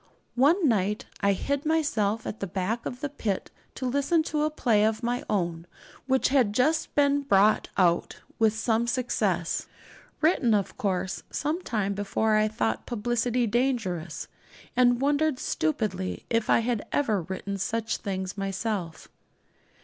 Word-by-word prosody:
One 305 +7 +4
night 210 -3 +1
I 200 0 +3
hid 280 +8 -2
myself 230 -9 0
at 215 - -5
the 195 - -3
back 195 +6 -2
of 245 - -7
the 290 - -2
pit 215 -9 -3 0.2
to 260 - -4
listen 280 +6 +2
to 305 -1 -1
a 305 - +2
play 235 -8 +2
of 220 +2 0
my 245 +1 -1
own 170 -4 -1 0.4
which 265 0 +2
had 255 -7 +3
just 305 +8 +1
been 285 0 +3
brought 210 -5 +3
out 175 -2 +2 0.2
with 220 -2 +4
some 225 +1 +1
success 250 0 0 0.5
written, 285 -9 +3
of 200 -2 -1
course, 190 -2 -2
some 310 +5 -2
time 210 - -1
before. 205 +2 0
I 215 0 +3
thought 115 - -2
publicity 240 +1 0
dangerous, 210 - -1 0.5
and 245 -1 +4
wondered 290 +1 +2
stupidly 185 0 -2
if 230 -1 +1
I - - +5
had 230 -2 -1
ever 220 -9 +1
written 190 +3 -5
such 225 +3 -1
things 190 -1 -4
myself. 195 -3 -3
225 Hz, 150 wpm, -27 LUFS, 200-260 Hz, 0.5 s, I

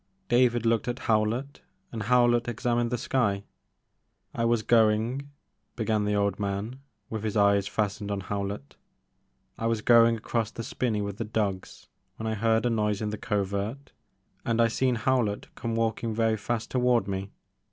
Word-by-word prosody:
David 120 -1 +3
looked 115 0 +2
at 120 0 -2
Howlett 115 +6 0 0.3
and 115 - -5
Howlett 120 +1 +3
examined 120 0 0
the 125 - -1
sky. 110 -5 0 0.9
I 115 - -1
was 115 -1 +2
going," 115 +5 +2 0.5
began 110 -2 0
the 105 0 +1
old 100 -1 0
man, 100 +5 -3 0.3
with 110 -1 -4
his 110 0 -1
eyes 100 -1 +4
fastened 105 -1 -2
on 100 -1 -2
Howlett, 100 -6 -5 0.8
I 115 - 0
was 115 -2 -1
going 115 -1 +6
along 110 - -14
by 115 -3 +2
the 115 - -4
spinney 110 -3 -1
with 100 -1 -5
the 115 - -2
dogs 105 -3 -3 0.3
when 110 - -6
I 110 - 0
heard 110 +2 +1
a 120 - +2
noise 105 -2 0
in 105 - -2
the 105 - -4
covert 105 +6 -2 0.5
and 115 0 0
I 115 0 +5
seen 125 +2 +1
Howlett 115 -3 0
come 115 -1 -3
walkin* 115 0 -1
very 115 0 +2
fast 110 +2 -3
toward 125 -3 +2
me. 95 0 -3
110 Hz, 170 wpm, -27 LUFS, 105-120 Hz, 0.9 s, going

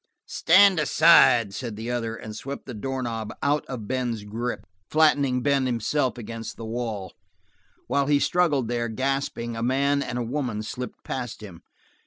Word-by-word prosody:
"Stand 185 +1 +5
aside," 135 -8 +5
said 115 -1 -5
the 115 +3 -5
other, 115 -2 -2
and 110 -1 -8
swept 140 +5 -7
the 130 - -7
doorknob 115 -2 -4
out 145 +1 +2
of 120 -6 -6
Ben's 125 -4 -2
grip, 115 +4 -4 0.2
flattening 145 -5 +3
Ben 140 -2 +2
himself 125 +3 0
against 115 0 -7
the 115 - -7
wall. 110 -4 -4 0.7
While 140 -1 0
he 145 -1 +4
struggled 145 -5 +1
there, 120 0 -1
gasping, 130 -1 -2
a 115 - -4
man 140 +3 +1
and 125 - -4
a 120 - -1
woman 120 -4 -3
slipped 125 +3 -7
past 125 -4 -5
him. 90 -6 -11
125 Hz, 160 wpm, -25 LUFS, 115-140 Hz, 0.7 s, Stand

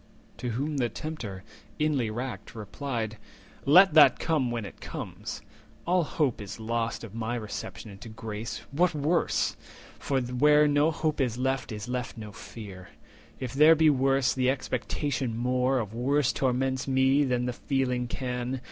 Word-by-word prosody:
To 125 +1 -3
whom 140 +6 -2
the 120 -3 +1
Tempter, 110 -10 -6 0.3
inly 145 -7 +1
racked, 120 +2 -5
replied:— 110 0 -4 0.5
"Let 180 +4 +7
that 155 -1 +7
come 150 -7 0
when 120 -3 -3
it - - -11
comes. - - -6 0.4
All 180 +1 +3
hope 140 -7 -1
is 100 +2 -7
lost 115 +1 -2
Of 110 -3 -9
my 115 +1 -2
reception 105 -2 -6
into 100 +4 -10
grace; 110 0 -6
what 170 +3 +2
worse? 155 +4 +1 0.4
For 135 -1 0
where 150 +5 +4
no 145 +2 +3
hope 155 -2 -1
is 120 -3 0
left 130 0 -1
is 105 +1 -6
left 125 -1 -4
no 105 -2 -7
fear. 100 -4 -10 0.5
If 130 -2 -4
there 155 +4 +7
be 160 -1 +5
worse, 135 -1 +2
the 130 -1 +1
expectation 130 -1 -2
more 125 +2 +1
Of 110 -4 -3
worse 130 +3 +1
torments 130 0 0
me 135 +2 +3
than 125 -2 0
the 125 - -2
feeling 125 -1 -1
can. 125 +1 -3
125 Hz, 155 wpm, -28 LUFS, 115-140 Hz, 0.5 s, Let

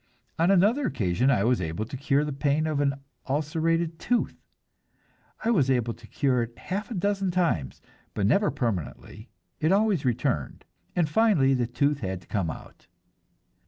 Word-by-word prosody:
On 170 +2 +3
another 210 +9 +3
occasion 110 0 +1
I 115 -8 +3
was 120 -2 +2
able 85 +6 -3
to 115 - -8
cure 140 +2 +1
the 150 - -3
pain 145 +3 +1
of 155 -2 -1
an 140 -1 +1 0.3
ulcerated 160 +3 0
tooth; 245 -1 -1 1.0
I 230 - +3
was 145 - +3
able 120 -3 +1
to - - -16
cure 130 -4 +1
it 115 0 -5
half 200 +4 -4
a 235 - -5
dozen 195 0 0
times, 170 - -1 0.3
but 100 - 0
never 200 - +3
permanently, 100 - -4 0.3
it 155 - +2
always 200 -5 +2
returned, 125 - -1 0.3
and 175 -3 +2
finally 150 -6 +3
the 125 -2 0
tooth 140 +4 0
had 95 -5 -3
to - - -21
come 95 -6 -1
out. - - -10
140 Hz, 165 wpm, -26 LUFS, 120-175 Hz, 1.0 s, On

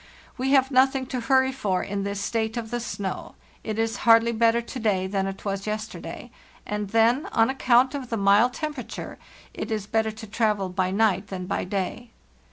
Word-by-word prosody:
We 260 +1 -1
have 265 0 +4
nothing 265 0 +3
to 255 - 0
hurry 265 +2 +3
for 205 -9 -1
in 200 0 -3
this 200 0 -3
state 220 +2 -2
of 225 -1 -5
the 240 - -1
snow; 200 -4 -5 0.3
it 215 -1 -4
is 225 0 0
hardly 230 0 +5
better 230 0 +3
to 235 +2 -7
day 200 -5 +1
than 195 0 -1
it 195 +2 -7
was 195 0 -3
yesterday, 215 +1 -5 0.3
and 210 -1 -3
then, 230 +6 +3
on 225 +2 +3
account 260 0 +3
of 270 -4 -5
the 230 - -1
mild 205 +5 +4
temperature, 295 -8 -6 0.3
it - - -5
is 215 -3 -2
better 220 +1 0
to 220 0 -8
travel 210 -3 0
by 185 0 0
night 200 -1 +1
than 185 -2 -5
by - - -2
day. 200 +5 -3
220 Hz, 190 wpm, -25 LUFS, 200-240 Hz, 0.3 s, hardly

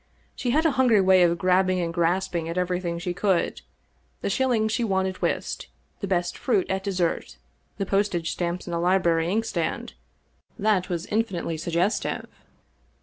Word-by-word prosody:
She 250 - -2
had 310 +6 +2
a 320 - +5
hun 260 -1 +2
gry 220 -4 +5
way 190 -1 +5
of 170 -1 +4
grabbing 185 +1 +2
and 170 -1 -2
grasping 170 0 0
at 170 - -4
everything 180 -1 -1
she 175 +1 -3
could 190 -1 0 0.3
— - - -40
the - - -1
shiUings 240 -5 +1
she 235 - 0
won 190 -3 +1
at 190 -1 -4
whist, - - -2 0.3
the 200 - -3
best 175 -2 -1
fruit 215 -8 +1
at 190 0 -1
dessert, 185 -4 -1 0.4
the 195 - -1
postage 195 -4 0
stamps 175 0 -3
in 175 - -6
the 170 - -1
library 170 -2 +2
inkstand 225 +4 -2 0.3
— - - -38
^that 205 -3 +2
was 170 -1 -2
infinitely 200 -7 -1
suggestive. 170 +6 -1
185 Hz, 175 wpm, -25 LUFS, 175-205 Hz, 0.4 s, a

